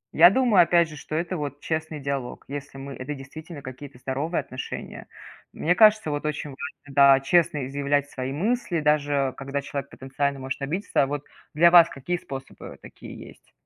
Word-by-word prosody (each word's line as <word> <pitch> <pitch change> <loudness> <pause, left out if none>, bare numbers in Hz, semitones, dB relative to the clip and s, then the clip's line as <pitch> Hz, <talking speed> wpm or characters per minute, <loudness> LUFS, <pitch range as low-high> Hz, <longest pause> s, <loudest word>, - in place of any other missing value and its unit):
Я 170 +3 +9
думаю, 220 -4 +4
опять 170 -1 +3
же, 155 - -10
что 150 +1 -7
это 170 +2 -2
вот 145 -1 -5
честный 160 -1 -3
диалог, 135 -3 -4
если 140 0 -7
мы 135 0 -7
это 135 +3 -6
действительно 145 +3 -10
какие-то 130 +1 -9
здоровые 140 +7 -2
отношения. 130 +1 -7 0.5
Мне 175 +3 +1
кажется, 215 -4 +5
вот 145 0 -3
очень 150 -1 -4
важно, 145 0 -9
да, 140 -1 +7
честно 150 0 +2
изъявлять 140 +1 -1
свои 130 0 -4
мысли, 195 - -1
даже 145 -3 +1
когда 140 +1 -4
человек 140 -1 -5
потенциально 135 +1 -3
может 135 +1 -5
обидеться. 175 +9 0
А - - 0
вот 145 +1 -4 0.3
для 170 +2 +6
вас 170 -1 +8
какие 175 +6 -3
способы 135 -5 -9
такие - - -12
есть? - - -20
145 Hz, 175 wpm, -25 LUFS, 135-165 Hz, 0.5 s, Я